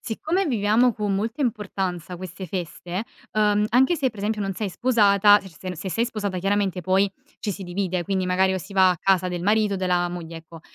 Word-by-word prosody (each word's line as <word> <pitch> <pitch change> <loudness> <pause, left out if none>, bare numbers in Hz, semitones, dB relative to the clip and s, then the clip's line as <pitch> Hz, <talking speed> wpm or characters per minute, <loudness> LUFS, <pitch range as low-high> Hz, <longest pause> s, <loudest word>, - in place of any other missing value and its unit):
siccome 320 - -1
viviamo 230 0 +2
con 205 -2 -1
molta 225 +8 -2
importanza 190 -6 -3
queste 185 +1 -8
feste, 180 +2 -4 0.3
uhm, 210 -1 +2
anche 265 +8 +3
se 270 -3 +1
per 220 -4 -13
esempio 210 +1 -1
non 195 -1 -2
sei 200 0 -3
sposata 205 -3 +5
cioè, 195 - -11
ser 160 - -19
sen 185 -1 -5
se 190 +3 -5
sei 230 +5 0
sposata 205 -5 -3
chiaramente 195 -1 0
poi 190 +3 +2 0.3
ci 210 - -3
si 195 - -7
divide, 180 0 -2
quindi 190 0 -1
magari 190 +1 +2
o - - -1
si 200 - -10
va 190 -1 +5
a 180 - +1
casa 185 -1 +2
del 175 -1 -4
marito 210 0 +2
o - - -2
della 180 -1 +1
moglie, 170 -2 -7
ecco. 165 0 -12
195 Hz, 220 wpm, -24 LUFS, 180-215 Hz, 0.3 s, sposata